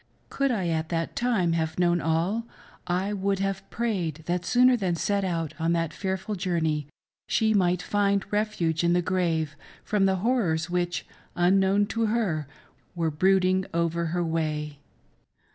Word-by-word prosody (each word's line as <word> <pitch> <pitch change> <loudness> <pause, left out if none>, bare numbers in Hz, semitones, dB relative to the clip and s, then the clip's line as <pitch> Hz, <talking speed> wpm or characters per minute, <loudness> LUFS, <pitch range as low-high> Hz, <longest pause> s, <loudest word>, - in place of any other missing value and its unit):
Could 275 0 0
I 195 -8 0
at 160 0 -1
that 165 -1 -2
time 215 -9 +1
have 160 -1 -1
known 175 -1 +2
all, 170 +9 0 0.4
I 185 +3 0
would 200 0 0
have 195 0 -3
prayed 180 -10 -2
that 175 0 -1
sooner 250 +5 +5
than 190 -7 0
set 200 +4 0
out 165 -4 -2
•on 165 +1 +1
that 165 -2 -1
fearful 190 +2 -3
journey 165 -6 -1 0.4
she 220 -1 +2
might 180 -3 +2
find 200 -1 +1
refuge 180 -7 0
in 170 0 +3
the 175 0 +2
grave 165 -4 0 0.3
from 200 -2 +2
the 190 - +2
horrors 180 -6 0
which, 175 -1 -1 0.3
unknown 195 +3 +3
to 225 +1 -1
her, 195 - 0 0.5
were 165 -2 0
brooding 185 +3 +3
over 170 0 0
her 175 +2 -1
way. 155 -3 -2
180 Hz, 155 wpm, -26 LUFS, 165-200 Hz, 0.5 s, sooner